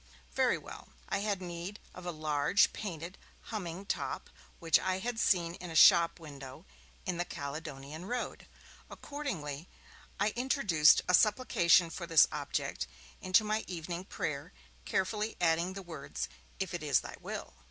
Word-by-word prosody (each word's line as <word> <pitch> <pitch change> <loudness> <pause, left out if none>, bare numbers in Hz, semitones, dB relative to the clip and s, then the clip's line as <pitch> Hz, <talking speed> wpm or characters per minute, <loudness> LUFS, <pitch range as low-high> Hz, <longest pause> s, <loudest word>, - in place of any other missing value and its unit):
Very - - +2
well; - - -10 0.2
I 195 - 0
had 200 -2 -1
need 175 +3 -5 0.2
of 180 0 -9
a - - -1
large 155 +3 +2
painted 175 -3 -6 0.3
humming 185 -2 -4
top - - -3 0.3
which 165 -2 +4
I 185 0 0
had 225 +4 -3
seen 170 -5 +2
in 180 -1 -8
a 165 - -7
shop 170 +1 +7
window 140 -4 -10 0.4
in 180 - -1
the 175 - +1
Caledonian 150 0 -6
Road. 245 +4 -4 0.4
Accordingly, 170 - -5 0.5
I 205 +2 +3
introduced 240 - +4
a 180 - +2
supplication 180 -5 +4
for 170 0 -6
this 165 -3 +7
object - - -3 0.3
into 185 +4 +4
my 215 +1 0
evening 175 0 -5
prayer, 140 - -4 0.3
carefully 210 +3 -1
adding 170 +2 +2
the 195 0 -7
words: 140 - -5 0.3
'If 190 -2 -2
it 175 - -3
is 145 -2 +3
Thy - - -8
will.' - - -6
175 Hz, 150 wpm, -32 LUFS, 155-195 Hz, 0.5 s, shop